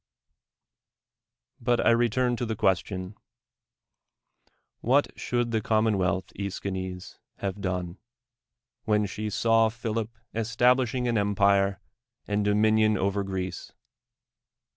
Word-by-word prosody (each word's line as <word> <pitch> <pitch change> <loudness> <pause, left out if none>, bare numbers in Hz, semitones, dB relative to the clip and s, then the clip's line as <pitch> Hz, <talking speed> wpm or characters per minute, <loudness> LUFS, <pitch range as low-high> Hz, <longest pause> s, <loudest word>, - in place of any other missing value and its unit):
But 120 0 +1
I - - +6
return 120 +1 +2
to 120 - -2
the 110 - -2
question 95 -1 -1 0.9
— - - -46
AVliat 135 +5 +2
should 120 -1 -1
the 110 -1 0
commonwealth, 100 -5 +1
^l^schines, 95 -2 -5 0.2
have 100 0 -4
done, 90 -2 -3 0.9
when 105 -1 +2
she 105 +2 -4
saw 115 +1 +3
Philip 115 -1 -3 0.2
establishing 120 +2 +2
an 115 -3 +1
empire 100 -1 +2 0.5
and 105 0 0
do 105 0 +2
minion 110 0 +3
over 100 +1 0
Greece? 95 -2 -5
105 Hz, 105 wpm, -27 LUFS, 95-115 Hz, 0.9 s, I